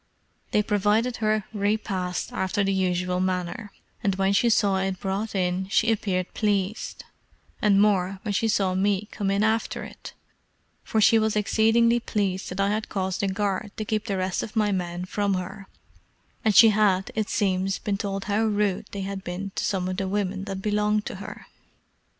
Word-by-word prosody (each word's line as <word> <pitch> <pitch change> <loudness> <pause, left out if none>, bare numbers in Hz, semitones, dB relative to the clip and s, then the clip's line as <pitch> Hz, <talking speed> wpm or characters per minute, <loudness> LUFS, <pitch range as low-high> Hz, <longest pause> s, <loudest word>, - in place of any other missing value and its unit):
They 210 - +2
provided 210 +4 +1
her 215 -1 +1
repast 200 -3 -1
after 195 +2 0
the 195 0 +1
usual 180 -1 0
manner, 185 +4 -2 0.3
and 195 -2 +1
when 195 +1 +1
she 235 +4 +3
saw 200 -3 +3
it 190 -1 -2
brought 200 +3 -3
in 185 0 0
she 225 +2 +3
appeared 185 -4 -1
pleased, 205 -1 -1 0.6
and 200 -2 +4
more 195 -2 +2
when 210 -3 -2
she 225 +3 +1
saw 195 -4 +1
me 200 +2 +1
come 200 -2 -2
in 200 +1 +2
after 220 +1 0
it; - - -10 0.7
for 220 - 0
she 225 +2 +6
was 220 -1 +1
exceedingly 225 +3 +3
pleased 195 -5 -2
that 180 - -6
I 200 0 +2
had 215 +1 -2
caused 190 -2 -2
a 200 - +1
guard 200 +1 -2
to 215 - -3
keep 215 +1 -2
the 200 -3 -1
rest 185 -1 -1
of 220 - -7
my 210 -2 +2
men 180 -1 -2
from 200 +1 0
her; 190 +2 -6 0.8
and 215 -2 +2
she 225 - +9
had, 200 -3 +2
it 215 -1 -2
seems, 190 -1 0
been 200 -2 -2
told 195 -1 -3
how 210 +2 +1
rude 210 -1 0
they 200 - -4
had 195 0 -5
been 190 +2 -5
to - - -3
some 185 -2 -1
of 185 0 -3
the 195 -1 -1
women 195 -1 -2
that 195 -1 -5
belonged 210 0 +1
to - - -5
her. 195 - -9
200 Hz, 185 wpm, -25 LUFS, 190-215 Hz, 0.8 s, she